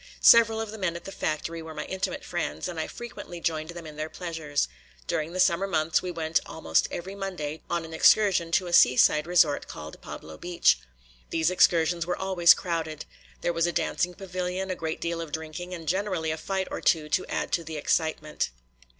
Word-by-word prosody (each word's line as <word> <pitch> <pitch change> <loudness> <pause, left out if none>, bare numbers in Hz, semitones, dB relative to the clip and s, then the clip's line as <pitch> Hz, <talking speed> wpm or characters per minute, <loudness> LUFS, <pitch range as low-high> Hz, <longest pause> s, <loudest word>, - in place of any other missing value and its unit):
Several 225 -1 +7
of 225 -1 -4
the 220 - -8
men 175 -3 -1
at 170 - -7
the 195 - -6
factory 165 -1 -3
were 160 -1 -9
my 150 - -4
intimate 190 0 -3
friends, 75 +2 -3
and 170 -2 -5
I 155 - -2
frequently 235 -7 -8
joined 160 -1 -2
them 170 -1 -8
in 155 -1 -10
their 155 +1 -3
pleasures. 160 -5 -2 0.4
During 155 +1 -2
the 185 - -5
summer 185 +1 +3
months 160 -3 +1
we 185 - -4
went 160 -2 0
almost 160 - +1
every 185 +3 -6
Monday 180 -6 -5
on 170 -1 -1
an 160 - -10
excursion 180 -1 +4
to 185 - +3
a 175 - -5
seaside 150 +3 +5
resort 165 -5 +3
called 75 0 -9
Pablo 80 0 -9
Beach. 175 0 +3 0.5
These 165 +1 +1
excursions 170 -1 +3
were 180 - -1
always 185 -3 +5
crowded. 165 -4 -3 0.4
There 175 - 0
was 165 0 +2
a - - 0
dancing 180 +1 -1
pavilion, 185 0 -3
a - - -1
great 160 -2 -4
deal 170 0 -2
of 165 -3 -7
drinking, 160 +3 -5
and 165 -3 -7
generally 185 -2 0
a 155 - -2
fight 190 +3 -2
or - - -4
two 155 -3 +2
to 185 - +1
add - - -2
to 170 - +1
the 160 -1 -6
excitement. 155 0 0
170 Hz, 200 wpm, -27 LUFS, 160-185 Hz, 0.5 s, Several